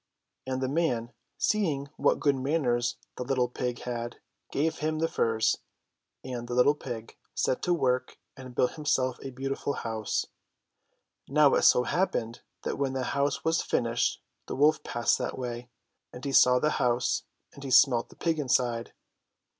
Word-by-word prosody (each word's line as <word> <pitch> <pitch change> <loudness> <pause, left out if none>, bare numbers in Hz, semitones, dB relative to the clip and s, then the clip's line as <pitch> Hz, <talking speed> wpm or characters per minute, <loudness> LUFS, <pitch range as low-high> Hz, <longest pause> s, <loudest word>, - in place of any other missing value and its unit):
And 130 0 -2
the - - +1
man, 130 -6 0 0.2
seeing 160 -10 0
what - - +2
good 145 -2 +3
manners 130 -4 0 0.2
the - - -3
little 125 -1 +1
pig 125 0 -4
had, 120 -1 -5 0.3
gave 160 +3 0
him 155 +1 -1
the 165 +1 +1
furze, 115 -7 +1 0.6
and 120 -2 -5
the 120 - -3
little 125 +4 +5
pig 120 -6 -7 0.2
set 130 - 0
to 180 - +1
work 130 -4 0 0.2
and 130 -2 -10
built 125 - +2
himself 135 -4 0
a 135 - -5
beautiful 135 +2 -3
house. 110 -4 -2 1.0
Now 145 0 +5
it - - +3
so 125 - +6
happened 120 -6 -1 0.2
that - - -3
when 135 -2 0
the 130 -1 -1
house 140 +1 0
was 165 0 +2
finished 115 -1 0 0.3
the - - -4
wolf 150 +3 +4
passed 120 0 +1
that - - -3
way; 120 -1 -5 0.4
and 125 +2 -9
he 140 - -1
saw 125 -1 +6
the 150 +4 +1
house, 125 0 +1 0.3
and 140 - -11
he 135 - -5
smelt 125 -1 +5
the - - -16
pig 165 -2 -1
inside. 125 -4 0
130 Hz, 165 wpm, -28 LUFS, 120-145 Hz, 1.0 s, so